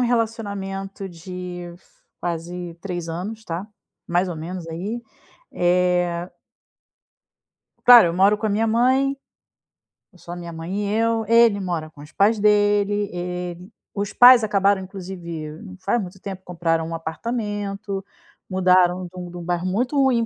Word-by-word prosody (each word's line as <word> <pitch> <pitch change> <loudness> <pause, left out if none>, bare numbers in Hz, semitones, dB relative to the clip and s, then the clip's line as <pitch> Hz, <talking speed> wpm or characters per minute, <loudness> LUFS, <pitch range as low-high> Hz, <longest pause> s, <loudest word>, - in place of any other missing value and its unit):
relacionamento 200 -5 -2
de 180 0 -7
f - - -26 0.3
quase 175 0 -4
3 175 -4 -4
anos, 210 +7 -5
tá, 170 +4 -4 0.4
mais 175 +2 +1
ou 165 - -5
menos 170 +2 -6
aí, 200 +9 -4 0.5
eh 180 0 +1 1.5
Claro, 240 -6 +10
eu - - -2
moro 195 +3 +4
com 220 - -2
a - - +1
minha 215 +2 +1
mãe. 260 +5 +2 1.0
É - - -19
só 170 - -11
a - - -4
minha 170 -1 -7
mãe 165 +4 -5
e 205 - -1
eu. 225 0 +1
Ele 230 -2 +5
mora 170 -5 -3
com 145 -2 -15
os 150 - -13
pais 210 +5 +3
dele, 205 0 +3
eh, 180 0 -4 0.4
os 200 -1 -3
pais 245 -1 +8
acabaram, 200 -2 +2
inclusive, 175 -5 -7
não 190 -4 -10
faz 200 +5 0
muito 190 0 -8
tempo, 190 -1 -7
compraram 165 -2 -1
um 165 - -4
apartamento. 205 +2 -4 0.5
Mudaram 185 -1 +3
de - - -9
um 180 -1 -6
de 175 - -9
um 175 - -7
bairro 175 +1 -2
muito 245 +9 -1
ruim 260 -4 +3
190 Hz, 155 wpm, -22 LUFS, 175-210 Hz, 1.5 s, Claro